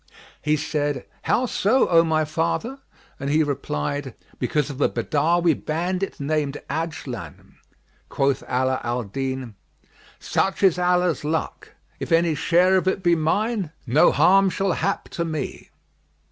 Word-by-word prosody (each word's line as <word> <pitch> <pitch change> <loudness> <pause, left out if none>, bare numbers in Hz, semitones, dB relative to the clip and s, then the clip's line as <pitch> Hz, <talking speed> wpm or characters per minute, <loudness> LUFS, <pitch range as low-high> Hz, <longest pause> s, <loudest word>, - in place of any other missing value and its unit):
He 150 0 +2
said, 145 -3 -2 0.2
"How 255 - +1
so, 240 +2 +2
O 165 -1 +5
my 155 -1 +1
father?"; 170 - -2 0.4
and 140 0 -3
he 155 +2 +3
replied, 140 - -3 0.2
"Because 145 +4 0
of 140 +1 -7
a - - +4
Badawi 165 +3 +1
bandit 180 +6 -3
named 145 0 -1
Ajlan." 140 - -6 0.5
Quoth 135 -1 +1
Ala 130 +1 0
al 120 +1 -1
Din, 130 +2 -4 0.6
"Such 195 +1 -1
is 180 -2 +4
Allah's 180 -2 +1
luck; 160 +2 -3 0.2
if - - -5
any 165 0 +3
share 180 +5 +3
of 185 - -1
it 190 0 0
be 175 -1 +4
mine, 190 +2 0
no 145 +8 +5
harm 195 +1 +5
shall 195 +1 0
hap 195 +3 -1
to 170 - -3
me." 155 -4 -5
155 Hz, 140 wpm, -23 LUFS, 140-180 Hz, 0.6 s, O